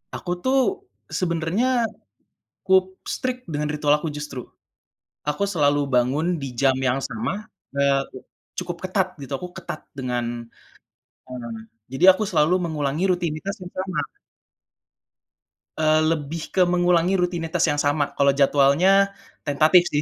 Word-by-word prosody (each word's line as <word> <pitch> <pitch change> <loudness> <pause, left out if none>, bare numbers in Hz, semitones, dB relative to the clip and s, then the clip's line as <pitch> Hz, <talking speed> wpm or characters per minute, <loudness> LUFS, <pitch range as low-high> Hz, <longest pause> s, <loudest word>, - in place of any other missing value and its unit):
Aku 175 - -5
tuh, 270 - +1 0.3
sebenarnya 185 +9 +1 0.8
cukup 190 -1 +4 0.2
strict 255 0 -3
dengan 150 -1 -2
ritual 150 0 +2
aku 155 +2 -4
justru. 150 -4 -6 0.8
Aku 150 +7 0
selalu 145 -7 +2
bangun 140 +6 +1
di 135 -2 -5
jam 135 +1 +4
yang 130 0 +1
sama, 215 - -4 0.3
eee, 140 -1 +3 0.6
cukup 175 -1 -5
ketat, 185 -1 0
gitu. 140 0 -7
Aku 180 +2 -8
ketat 180 -4 -7
dengan, 120 -3 -3 0.8
mmm, 120 -3 -7 0.3
jadi 135 +9 +6
aku 215 - -2
selalu 180 0 +3
mengulangi 155 0 -1
rutinitas 175 +1 -1
yang 180 - -9
sama. 185 -1 -3 1.8
Eee, 155 0 +4
lebih 160 +1 -3
ke 190 - +3
mengulangi 175 0 +3
rutinitas 175 -1 -1
yang 145 - 0
sama. 145 +1 +2
Kalo 140 0 +4
jadwalnya, 140 +5 +4 0.6
tentatif 155 +5 +5
sih. 145 - +2
160 Hz, 125 wpm, -23 LUFS, 140-185 Hz, 1.8 s, jadi